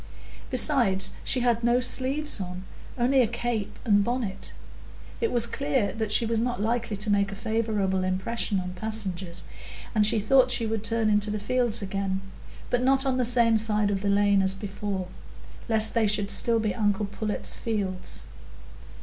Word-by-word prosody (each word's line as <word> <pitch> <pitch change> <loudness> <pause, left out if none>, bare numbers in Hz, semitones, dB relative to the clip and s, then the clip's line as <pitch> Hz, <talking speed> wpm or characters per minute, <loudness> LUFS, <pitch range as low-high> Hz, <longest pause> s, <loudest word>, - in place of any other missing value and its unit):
Besides, 245 -8 +3
she 255 - 0
had 240 -1 +1
no 240 +1 +3
sleeves 260 +1 +1
on,—only 215 +8 -2
a 240 - +2
cape 235 -2 -3
and 205 -3 +4
bonnet. 235 -4 -3 0.7
It 460 - 0
was 235 -1 +4
clear 265 -3 -1
that 220 -1 -3
she 230 - +3
was 225 0 0
not 245 0 -1
likely 225 0 -1
to 210 +2 0
make 200 -1 +1
a - - -6
favourable 210 -3 -1
impression 190 +2 -1
on 180 0 -5
passengers, 190 -3 -4 0.5
and 215 -2 +3
she 215 +1 +3
thought 255 +5 +4
she 240 -2 +1
would 220 -1 -2
turn 225 0 0
into 210 0 +2
the 210 - -2
fields 230 +1 0
again, 195 0 -2 0.5
but 245 - +1
not 270 +1 +3
on 260 -1 +1
the 255 - +1
same 230 -2 +4
side 210 -1 0
of 195 -1 -2
the 200 - -1
lane 200 0 +3
as 190 0 +2
before, 195 -1 -4 0.6
lest 220 -1 +4
they 230 -2 +2
should 205 0 0
still 230 -1 +3
be 215 -2 -1
uncle 205 -2 0
Pullet's 205 +1 -3
fields. 195 -5 -4
215 Hz, 170 wpm, -26 LUFS, 200-240 Hz, 0.7 s, and